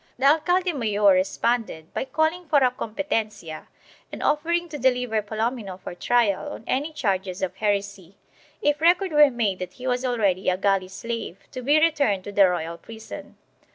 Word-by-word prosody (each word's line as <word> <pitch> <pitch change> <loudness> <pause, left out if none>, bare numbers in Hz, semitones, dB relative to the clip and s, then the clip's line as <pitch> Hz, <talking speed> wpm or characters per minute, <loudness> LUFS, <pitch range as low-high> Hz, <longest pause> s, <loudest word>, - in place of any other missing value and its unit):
The 260 - -1
alcalde 355 +5 +3
mayor 210 -6 +3
responded 190 -2 -1
by - - -2
calling 315 +4 -1
for 300 - +3
a 255 -3 +4
competencia 215 - -4 0.4
and - - -6
offering 340 +3 +1
to 295 -1 -6
deliver 250 -3 +1
Palomino 220 -2 -3
for - - -7
trial 235 +7 +1
on - - -10
any 290 +5 -1
charges 190 -8 -2
of 190 - -3
heresy, 200 -3 -2 0.5
if 295 0 +1
record 355 +3 +3
were 300 -1 +6
made 220 -7 -1
that 180 - -6
he 255 - -10
was 250 0 0
already 205 -8 +1
a 180 - +1
galley 195 -1 +1
slave 225 0 -5
to 255 - -6
be 290 +5 +4
returned 285 - +2
to 205 - -7
the 200 -2 +5
royal 170 -1 -3
prison. 220 +4 -10
230 Hz, 170 wpm, -24 LUFS, 195-290 Hz, 0.5 s, were